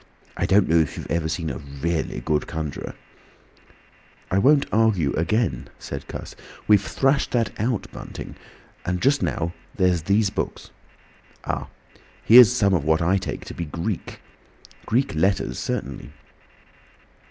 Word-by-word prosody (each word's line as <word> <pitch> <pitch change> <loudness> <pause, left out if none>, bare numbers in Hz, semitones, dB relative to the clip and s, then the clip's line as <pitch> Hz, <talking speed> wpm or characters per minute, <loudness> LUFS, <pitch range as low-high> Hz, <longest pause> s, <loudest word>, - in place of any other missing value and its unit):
I - - -1
don't 100 0 +4
know 85 - +4
if 80 -3 0
you - - -5
have - - -9
ever 80 -1 0
seen 80 -1 -2
a 65 - -6
really 75 +4 -3
good 75 -1 0
conjuror—" 80 -3 -5 1.4
"I 95 - +3
won't 140 +6 +5
argue 100 -10 +2
again," 85 - 0
said - - -7
Cuss. - - -7 0.3
"We've 105 -2 +6
thrashed 135 +5 +1
that 115 -3 +1
out, 115 0 0
Bunting. - - -8 0.5
And 90 0 -1
just 140 +7 +2
now 85 +1 -1 0.2
there's 90 -3 +2
these 100 +4 +2
books—Ah! 105 - -7 0.6
here's 120 0 +9
some 100 -6 +2
of 85 -6 +1
what 80 +2 +2
I 95 +3 +3
take - - -5
to - - -8
be 85 - -4
Greek! 85 +6 -4 0.7
Greek 125 -1 +1
letters 95 +5 0
certainly." - - -4
95 Hz, 140 wpm, -23 LUFS, 80-110 Hz, 1.4 s, here's